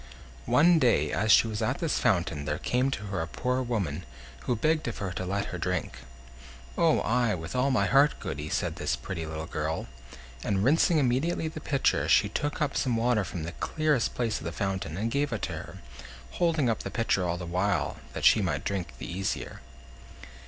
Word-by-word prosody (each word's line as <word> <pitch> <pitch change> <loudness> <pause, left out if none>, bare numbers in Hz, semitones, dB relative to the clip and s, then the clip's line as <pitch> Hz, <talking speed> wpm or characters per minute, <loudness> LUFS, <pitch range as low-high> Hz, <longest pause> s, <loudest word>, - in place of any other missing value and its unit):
One 165 +3 +5
day, 95 - +3
as 110 +2 +1
she - - +7
was 110 0 -3
at 120 +5 0
this 165 -4 0
fountain, 85 -5 +1
there 75 0 -1
came 125 - 0
to 135 - -4
her 100 -4 -3
a 80 - -3
poor 125 +8 -1
woman, 95 - -2 0.4
who 125 - +1
begged 155 +6 +1
of 115 - -4
her 95 -2 -3
to 90 0 -4
let 100 +2 -1
her - - -4
drink. - - -2 0.8
"Oh! 165 -2 +3
ay, 115 -2 +2
with 80 +3 -7
all 125 +2 +2
my 110 -7 +2
heart, 140 +7 +4
Goody," 75 +2 -5
said - - -1
this - - 0
pretty 80 +6 -5
little 80 0 -5
girl; 80 0 -3 0.6
and 100 -2 0
rinsing 160 +6 +4
immediately 145 +5 +1
the 155 0 -8
pitcher, 140 -3 +1
she - - +5
took 145 +1 -1
up 140 - -2
some 125 -4 +1
water 115 -2 +2
from 90 -2 -5
the 85 - -4
clearest 155 - 0
place 115 -3 -1
of - - -10
the 85 - -3
fountain, 95 -2 -3
and 110 +3 -1
gave 145 +1 0
it 110 - -3
to - - -2
her, - - -8 0.5
holding 165 -6 +1
up 115 - +1
the - - -5
pitcher 100 -2 0
all 85 0 -1
the 90 - -6
while, 90 +3 0 0.2
that - - -3
she - - +6
might - - -1
drink 90 -11 -3
the - - -7
easier. 95 +3 -4
110 Hz, 205 wpm, -28 LUFS, 90-135 Hz, 0.8 s, she